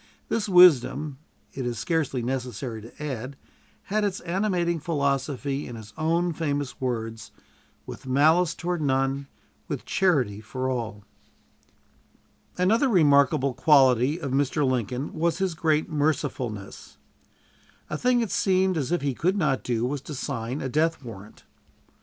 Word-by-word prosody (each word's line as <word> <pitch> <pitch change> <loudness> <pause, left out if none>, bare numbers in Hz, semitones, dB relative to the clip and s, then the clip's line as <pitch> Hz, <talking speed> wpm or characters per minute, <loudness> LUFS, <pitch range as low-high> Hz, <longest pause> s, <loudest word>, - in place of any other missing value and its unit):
This 215 -2 -1
wisdom, 155 -5 +5 0.3
it 135 - -4
is 120 -1 -3
scarcely 135 0 -1
necessary 125 -2 -4
to 115 +7 -11
add, 135 -1 -5 0.5
had 210 +1 -1
its 200 -2 -1
animating 175 -2 0
philosophy 140 -2 -1
in 120 - -7
his 110 -2 -11
own 170 +2 0
famous 145 -5 -3
words, 115 -3 -3 0.6
"With - - -9
malice 160 +6 +3
toward 175 -1 -2
none, 135 0 0 0.4
with - - -5
charity 130 - +1
for 130 +4 -4
all." 115 -5 -3 1.5
Another 225 +9 +3
remarkable 140 - +4
quality 135 +1 +4
of 140 -6 -4
Mr. 140 +1 +1
Lincoln 125 +2 -2
was 165 +1 0
his 190 -2 -1
great 155 -1 +1
mercifulness. 145 - -3 0.9
A 150 - -4
thing 245 +8 +2
it 225 - -2
seemed 190 -2 +2
as 145 0 -2
if 175 -4 0
he 140 -2 0
could 185 +10 0
not 150 -8 +1
do 120 -1 -1
was 140 +2 -2
to 150 +1 -8
sign 120 +1 -4
a 135 - -2
death 155 +3 0
warrant. 110 -3 -11
140 Hz, 140 wpm, -25 LUFS, 125-170 Hz, 1.5 s, wisdom